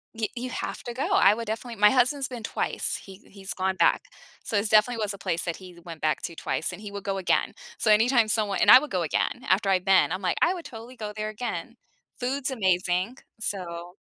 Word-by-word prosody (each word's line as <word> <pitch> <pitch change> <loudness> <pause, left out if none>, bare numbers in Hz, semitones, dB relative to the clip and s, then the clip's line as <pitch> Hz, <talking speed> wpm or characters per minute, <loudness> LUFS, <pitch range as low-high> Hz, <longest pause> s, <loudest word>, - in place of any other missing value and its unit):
Y 225 -1 -1
you 250 +1 -4
have - - -5
to 240 - -6
go, 255 - -5
I 200 - +6
would 230 0 -5
definitely 225 0 -5
my 210 - +8
husband's 265 +2 +2
been 245 -3 -8
twice, - - -1
he 190 -1 -12
he's 195 -1 -7
gone 190 0 -1
back. - - +3 0.4
So 215 - -4
it's 205 +1 0
definitely 225 +2 +3
was 205 -1 -2
a 200 - -9
place 170 -2 -2
that 170 - -2
he 180 -2 -13
went 165 -3 -9
back 155 0 0
to 170 - -5
twice, 160 - -2
and - - -9
he 205 -1 -8
would 200 -1 -7
go 195 -1 -2
again. 185 - 0 0.3
So 220 - +1
anytime 225 +2 +4
someone 210 -2 0
and - - +4
I - - +12
would 300 - -7
go 185 - 0
again, 170 +9 -1
after 195 +1 +2
I've 185 0 +2
been, 190 -3 +4
I'm 185 +2 -3
like, 180 -2 -1
"I 350 - +4
would 345 -4 -8
totally 240 -1 -10
go 210 -2 -6
there 215 0 -2
again." 225 +3 -5 0.4
Food's 265 +2 -2
amazing, 185 -1 0 0.2
so 175 -4 -5
210 Hz, 235 wpm, -26 LUFS, 185-240 Hz, 0.4 s, I